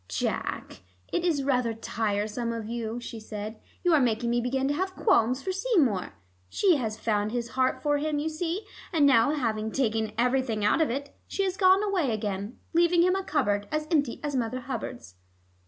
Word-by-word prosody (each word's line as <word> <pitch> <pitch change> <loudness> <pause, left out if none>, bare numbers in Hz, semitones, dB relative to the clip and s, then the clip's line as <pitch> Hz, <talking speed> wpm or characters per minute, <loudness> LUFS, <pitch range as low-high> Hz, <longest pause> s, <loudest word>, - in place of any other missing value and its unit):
"Jack, - - -3 0.3
it 345 - +1
is 315 -6 +1
rather 250 -4 +1
tiresome 220 +1 -2
of 230 -2 -4
you," 230 0 -4
she 235 -1 -7
said. 215 0 -7 0.2
"You 355 -2 +4
are 310 - +6
making 235 -2 +1
me 240 0 +2
begin 265 +2 0
to - - +2
have 375 +4 -2
qualms 255 - +2
for 380 - -1
Seymour. 360 - +1 0.4
She 360 - +3
had 225 -5 -2
found 215 -1 0
his 240 -1 -2
heart 260 +1 0
for 290 -1 +2
him, 300 0 -1
you 295 +2 -1
see, 335 +5 -3 0.3
and 315 -5 +4
now 265 -3 +5
having 220 -6 -1
taken 220 -4 0
everything 245 -3 +1
out 215 +10 +3
of 315 - +2
it, 280 +3 -4
she 395 - -1
has 375 -1 -1
gone 380 +1 +5
away 380 -9 +1
again, 205 0 -3 0.2
leaving 340 +1 +4
him 365 +1 +3
a 385 - -1
cupboard 205 - 0
as 305 0 -1
empty 285 -7 +1
as 290 -2 -2
Mother 255 +1 -1
Hubbard's." 240 - -6
255 Hz, 190 wpm, -27 LUFS, 225-310 Hz, 0.4 s, are